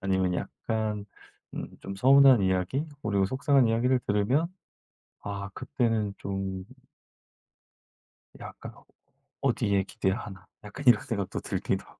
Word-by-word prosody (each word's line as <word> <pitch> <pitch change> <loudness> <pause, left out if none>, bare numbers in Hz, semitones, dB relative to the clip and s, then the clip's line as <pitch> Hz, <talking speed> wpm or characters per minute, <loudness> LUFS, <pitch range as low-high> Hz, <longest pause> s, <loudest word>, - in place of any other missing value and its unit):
아니면 95 -2 +1
약간 105 +1 -3 0.5
음 - - -5
좀 95 - -6
서운한 135 +1 +7
이야기, 95 +9 +1 0.2
그리고 100 -3 +1
속상한 135 - +3
이야기를 125 +3 +2
들으면 105 +11 +2 0.7
아 100 -1 -5
그때는 115 -5 -1
좀 95 -1 -4 1.8
약간 - - -9 0.7
'어디에 100 -1 +1
기대야 95 +1 -1
하나?' 95 -5 -9 0.2
약간 130 +7 -9
이런 120 -3 +7
생각도 100 -5 -3
들기도 - - -2
하고 - - -20
105 Hz, 265 characters per minute, -28 LUFS, 95-125 Hz, 1.8 s, 서운한